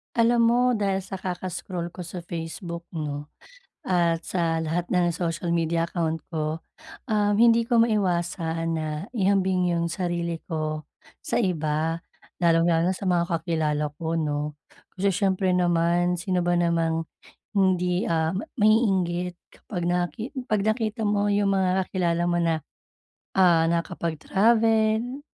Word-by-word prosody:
Alam 235 +1 +4
mo, 235 - +3 0.2
dahil 195 -2 0
sa 190 0 -7
kaka-scroll 180 -1 -4
ko 180 - -15
sa 175 0 -7
Facebook 170 +1 -6
'no, 150 -2 -4 0.6
at 170 -2 +2
sa 165 -3 0
lahat 165 +2 -2
ng 180 -2 +3
social 170 0 -2
media 165 0 0
account 165 -2 -1
ko, 155 -1 -2 0.5
um, 210 -2 +2
hindi 230 0 +5
ko 235 0 +3
maiwasan 175 -6 0
na 155 -1 -2 0.3
ihambing 190 -3 +2
yung 170 0 0
sarili 170 -1 -2
ko 155 -2 -3 0.4
sa 235 - 0
iba, 160 -4 0 0.5
lalong-lalo 165 +1 +3
na - - -4
sa 195 - -6
mga 175 -1 +3
kakilala 160 -3 -1
ko 165 0 -2
'no, 150 -1 -2 0.4
kasi 200 +2 +2
siyempre 190 -1 +1
naman, 175 0 +2
sino 180 -1 0
ba 175 - +2
namang 165 -1 +1 0.5
hindi, 180 -2 +2
ah, 160 -1 +1
ma 200 - -3 0.2
maiinggit 190 -5 +2
kapag 180 -4 -7
nakit 180 +8 -1 0.2
'pag 215 -4 +1
nakita 220 +1 -1
mo 205 0 +1
yung 200 -1 +2
mga 190 0 +1
kakilala 175 -2 0
mo 175 0 +1
na, 165 -2 +1 0.8
ah, 170 -3 +5
nakakapag-travel, 220 - +1
175 Hz, 135 wpm, -25 LUFS, 165-195 Hz, 0.8 s, hindi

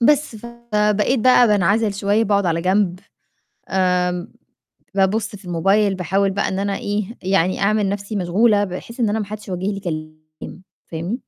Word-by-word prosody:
بس، 285 -1 +2
فبقيت 220 0 0
بقى 250 0 +6
بانعَزِل 205 +1 +2
شوية 205 +3 +1
باقعُد 200 -2 +1
على 165 0 0
جنب، 185 0 +1 0.7
آمم 180 -1 0 0.6
بابُص 200 +2 +1
في 195 - -16
الموبايل 195 +4 +2
باحاول 190 +2 0
بقى 200 +1 -1
إن 190 - -3
أنا 200 0 -1
إيه 205 +1 -2 0.2
يعني 185 -1 +1
أعمل 210 0 +2
نَفْسي 200 +2 -4
مشغولة 205 +3 +2
بحيث 200 +6 -8
إن 225 - +2
أنا 215 +2 0
ما 210 - -2
حدش 210 +1 -9
يوجّه 185 0 -3
لي 200 -1 -2
كلام، 155 0 -8 0.2
فاهمني؟ 170 +7 -4
200 Hz, 160 wpm, -20 LUFS, 180-210 Hz, 0.7 s, بقى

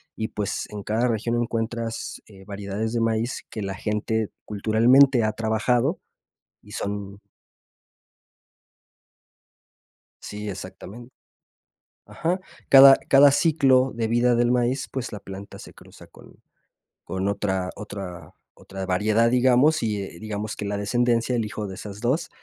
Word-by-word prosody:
y, 110 - -3
pues, 105 -2 -4
en 105 -1 -7
cada 110 +5 0
región 115 0 -1
encuentras, 115 0 -4
eh, 95 -2 -15
variedades 100 +2 -4
de 115 - 0
maíz 115 +1 -1
que 110 - -6
la 95 0 -3
gente 105 +2 -2 0.2
culturalmente 115 +5 +4
ha 110 - +1
trabajado 120 - 0 0.6
y - - -16
son 100 0 -5 3.0
Sí, 105 0 -6
exactamen 95 +6 -9 0.9
ajá. 175 +3 -2 0.3
Cada 135 0 +10
cada 140 +1 +7
ciclo 135 -5 +3
de 115 -1 -1
vida 120 +1 +2
del 120 0 +2
maíz, 125 +2 0
pues, 130 -2 -5
la 105 - -6
planta 100 +1 -10
se - - -12
cruza - - -16
con - - -18 0.6
con 95 +1 -3
otra 95 -2 -1
otra 95 -5 -8 0.2
otra 95 0 -8
variedad, 105 +5 +2
digamos, 130 +5 +4
y, 105 -3 -1
eh, 85 -3 -10
digamos 105 +1 -5
que 105 - -5
la 100 0 -2
descendencia, 120 +3 +1
el 115 -2 0
hijo 105 0 -5
de 95 - -7
esas 100 +1 -9
2, 130 +8 -1
110 Hz, 135 wpm, -24 LUFS, 100-120 Hz, 3.0 s, Cada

